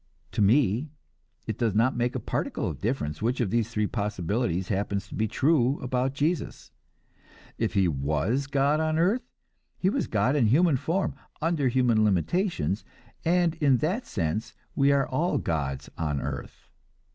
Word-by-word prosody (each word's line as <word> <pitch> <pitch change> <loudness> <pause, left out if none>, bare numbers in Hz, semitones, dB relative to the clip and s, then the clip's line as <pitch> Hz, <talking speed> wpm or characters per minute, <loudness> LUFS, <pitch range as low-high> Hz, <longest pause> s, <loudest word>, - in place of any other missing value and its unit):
To - - -1
me 115 +5 +3 0.6
it - - -4
does 115 -4 +1
not 115 +4 +3
make 120 +1 0
a - - 0
particle - - -2
of 70 -2 -5
difference 100 - -2
which 120 +4 0
of 115 -6 0
the 115 +1 +3
three 110 -1 -1
possibilities 100 -3 -1
happens 100 0 -1
to - - -11
be 110 - 0
true 135 +3 +2
about 130 +1 -1
Jesus. 155 +3 -2 0.9
If - - -1
he 95 -2 +4
was 80 - 0
God 145 +2 +2
on 155 0 +1
earth, 195 +9 +2 0.6
he 190 - +1
was - - -1
God 110 +6 +1
in 125 -6 +3
human 150 +5 +4
form, 175 +9 -1 0.3
under 160 -4 +1
human 120 -3 +3
limitations, 105 - 0 0.4
and 175 0 +2
in 140 -4 +5
that 180 - -1
sense 85 +3 -2 0.2
we 140 0 +4
are 140 -1 +2
all 160 +7 0
gods 70 -4 -2
on 75 -3 -1
earth. - - -6
120 Hz, 160 wpm, -27 LUFS, 100-145 Hz, 0.9 s, in